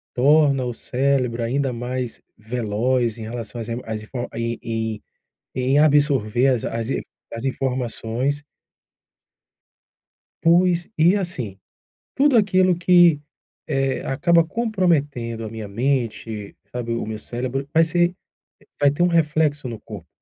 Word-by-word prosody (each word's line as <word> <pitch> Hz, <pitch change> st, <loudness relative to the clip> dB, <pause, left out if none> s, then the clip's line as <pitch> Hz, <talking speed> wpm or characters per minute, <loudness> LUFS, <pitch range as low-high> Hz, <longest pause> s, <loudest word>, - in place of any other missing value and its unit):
torna 140 Hz, 0 st, +4 dB
o 120 Hz, -, -3 dB
cérebro 125 Hz, -2 st, 0 dB
ainda 135 Hz, +3 st, 0 dB
mais 125 Hz, 0 st, -4 dB, 0.2 s
veloz 115 Hz, +1 st, -1 dB
em 110 Hz, -, -7 dB
relação 115 Hz, +1 st, -6 dB
as 110 Hz, -, -6 dB
emo 115 Hz, +2 st, -3 dB
as 110 Hz, -1 st, -4 dB
info 120 Hz, +2 st, -5 dB
e 115 Hz, 0 st, -2 dB
em 110 Hz, -2 st, -3 dB, 0.5 s
em 130 Hz, +3 st, +2 dB
absorver 140 Hz, -5 st, +3 dB
as 125 Hz, -4 st, +1 dB
a -, -, -3 dB
as 115 Hz, +1 st, -3 dB
i -, -, 0 dB, 0.3 s
as 115 Hz, +3 st, -5 dB
informações. 130 Hz, +1 st, -2 dB, 2.0 s
Pois, 175 Hz, +1 st, +3 dB
e 170 Hz, +5 st, +5 dB
assim, 130 Hz, -, -3 dB, 0.6 s
tudo 280 Hz, -1 st, +4 dB
aquilo 185 Hz, -4 st, +4 dB
que, 175 Hz, -3 st, +5 dB, 0.5 s
eh, 135 Hz, -1 st, 0 dB
acaba 165 Hz, +5 st, +3 dB
comprometendo 150 Hz, -, -1 dB
a -, -, -5 dB
minha 110 Hz, -1 st, -7 dB
mente, 115 Hz, -3 st, -2 dB, 0.2 s
sabe, 120 Hz, -1 st, -3 dB
o 115 Hz, -, -2 dB
meu 110 Hz, 0 st, -5 dB
cérebro, 130 Hz, +4 st, -4 dB
vai 165 Hz, +1 st, +5 dB
ser 175 Hz, +2 st, +2 dB, 0.6 s
vai 145 Hz, -, +5 dB
ter 145 Hz, +5 st, 0 dB
um 175 Hz, -, +5 dB
reflexo 155 Hz, -4 st, +1 dB
no 115 Hz, -2 st, -7 dB
corpo. 100 Hz, -8 st, -10 dB
130 Hz, 135 wpm, -22 LUFS, 115-155 Hz, 2.0 s, e